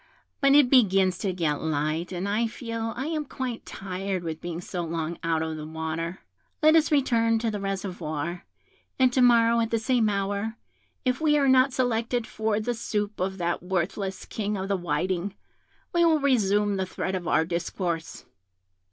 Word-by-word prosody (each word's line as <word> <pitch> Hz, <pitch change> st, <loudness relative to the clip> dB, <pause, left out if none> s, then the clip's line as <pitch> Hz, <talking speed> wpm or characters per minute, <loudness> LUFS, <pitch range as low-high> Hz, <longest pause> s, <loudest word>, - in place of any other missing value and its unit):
But 275 Hz, 0 st, +5 dB
it 290 Hz, -3 st, +7 dB
begins 195 Hz, -7 st, +4 dB
to 195 Hz, -, -1 dB
get 160 Hz, -5 st, -1 dB
light, 155 Hz, +2 st, -1 dB
and 185 Hz, +2 st, -3 dB
I 215 Hz, +3 st, +1 dB
feel 230 Hz, -1 st, -4 dB
I 265 Hz, -, -2 dB
am 310 Hz, -1 st, -1 dB
quite 255 Hz, -4 st, -5 dB
tired 190 Hz, -1 st, -4 dB
with 160 Hz, -1 st, -5 dB
being 170 Hz, -1 st, -4 dB
so 180 Hz, 0 st, -4 dB
long 165 Hz, 0 st, -3 dB
out 165 Hz, -1 st, +1 dB
of 160 Hz, -1 st, -4 dB
the 155 Hz, 0 st, -6 dB
water; 160 Hz, +2 st, -4 dB, 0.4 s
let 310 Hz, +1 st, +7 dB
us 320 Hz, 0 st, +4 dB
return 230 Hz, -5 st, +3 dB
to 225 Hz, 0 st, -1 dB
the 210 Hz, -, -3 dB
reservoir, 180 Hz, -4 st, -4 dB, 0.5 s
and 255 Hz, -1 st, +4 dB
to 255 Hz, -, +3 dB
morrow, 235 Hz, -1 st, +5 dB
at 225 Hz, -1 st, +1 dB
the 230 Hz, -, +1 dB
same 225 Hz, -1 st, +2 dB
hour, 200 Hz, +2 st, -2 dB, 0.5 s
if 255 Hz, +3 st, 0 dB
we 300 Hz, -1 st, +4 dB
are 280 Hz, -1 st, +3 dB
not 260 Hz, +1 st, +5 dB
selected 240 Hz, -1 st, 0 dB
for 220 Hz, -1 st, -1 dB
the 240 Hz, +3 st, -1 dB
soup 210 Hz, -2 st, -3 dB
of 190 Hz, +1 st, -1 dB
that 175 Hz, -1 st, -1 dB
worthless 190 Hz, +2 st, -2 dB
King 210 Hz, -1 st, -3 dB
of 190 Hz, +1 st, -4 dB
the 200 Hz, -, +2 dB
Whiting, 180 Hz, +3 st, -2 dB, 0.6 s
we 345 Hz, 0 st, +4 dB
will 320 Hz, -2 st, +4 dB
resume 210 Hz, -7 st, +2 dB
the 190 Hz, -1 st, -1 dB
thread 190 Hz, +1 st, -3 dB
of 180 Hz, -2 st, -3 dB
our 160 Hz, -, +3 dB
discourse. 170 Hz, -1 st, -3 dB
200 Hz, 180 wpm, -26 LUFS, 175-235 Hz, 0.6 s, it